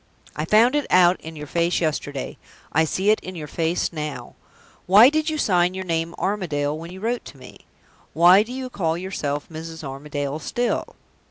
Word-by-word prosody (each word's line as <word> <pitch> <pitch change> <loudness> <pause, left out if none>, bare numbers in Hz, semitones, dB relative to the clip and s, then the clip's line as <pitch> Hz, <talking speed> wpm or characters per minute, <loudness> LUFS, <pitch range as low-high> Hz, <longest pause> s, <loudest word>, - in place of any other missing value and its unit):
I 150 - -2
found 225 - +4
it 295 - 0
out 180 0 +4
in 160 0 -9
your 150 -1 -7
face 170 +3 0
yesterday. 145 -4 -3 0.3
I 160 +2 +3
see 190 +6 +1
it 215 - +2
in 185 - -9
your 155 -3 -6
face 165 +4 -1
now. 150 -2 -6 0.5
Why 210 +7 +8
did 310 +1 0
you 310 - -2
sign 180 -7 +2
your 190 0 -5
name 165 -1 -2
'Armadale' 155 -8 -1
when 165 +2 -8
you 185 - -9
wrote 235 +4 -2
to 140 - -11
me? 130 -1 -15 0.5
Why 175 +5 +7
do 225 +3 -5
you 255 0 -5
call 165 -6 -1
yourself 150 -6 -4
'Mrs. 160 0 -8
Armadale' 145 +1 -4
still?" 240 +9 -2
170 Hz, 185 wpm, -23 LUFS, 150-195 Hz, 0.5 s, Why